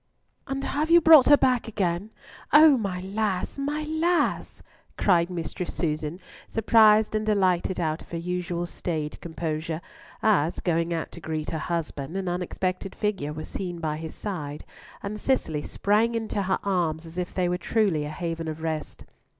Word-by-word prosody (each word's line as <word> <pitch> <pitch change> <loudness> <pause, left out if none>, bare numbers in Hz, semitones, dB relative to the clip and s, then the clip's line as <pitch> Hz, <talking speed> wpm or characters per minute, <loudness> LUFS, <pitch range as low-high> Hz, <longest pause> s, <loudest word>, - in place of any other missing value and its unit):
"And 270 0 -3
have 300 +4 -1
you 340 +1 +8
brought 315 -5 +8
her 290 - +8
back 250 -3 +2
again! 195 -2 -1 0.4
O 300 -1 +8
my 195 -6 -2
lass! 195 +3 -2
my 295 +2 -2
lass!" 320 +3 0 0.3
cried 175 -3 +3
Mistress 175 0 -5
Susan, 155 0 -2 0.3
surprised 220 -1 +5
and 215 0 0
delighted 190 -4 +1
out 160 -1 -1
of - - -15
her 170 - -4
usual 175 0 -2
staid 155 -3 -4
composure, 160 -1 -3 0.4
as, 180 -7 +2
going 170 -1 0
out 165 -1 -3
to 170 - -10
greet 155 -1 -3
her 160 - -2
husband, 165 -1 -3
an 190 -1 -3
unexpected 185 +1 -2
figure 195 -8 -2
was 155 +1 -6
seen 175 -3 -5
by 155 -2 -2
his 160 0 -7
side, 150 -8 -5 0.4
and 210 +1 -4
Cicely 160 - 0
sprang 215 +8 +1
into 220 -2 -2
her 190 -1 +1
arms 170 -5 0
as 165 +2 -7
if 180 - -4
they 185 -2 +1
were 180 0 -1
truly 200 -10 +1
a 150 - -4
haven 165 +1 -4
of 160 0 -5
rest. 160 -2 -4
180 Hz, 165 wpm, -26 LUFS, 165-215 Hz, 0.4 s, you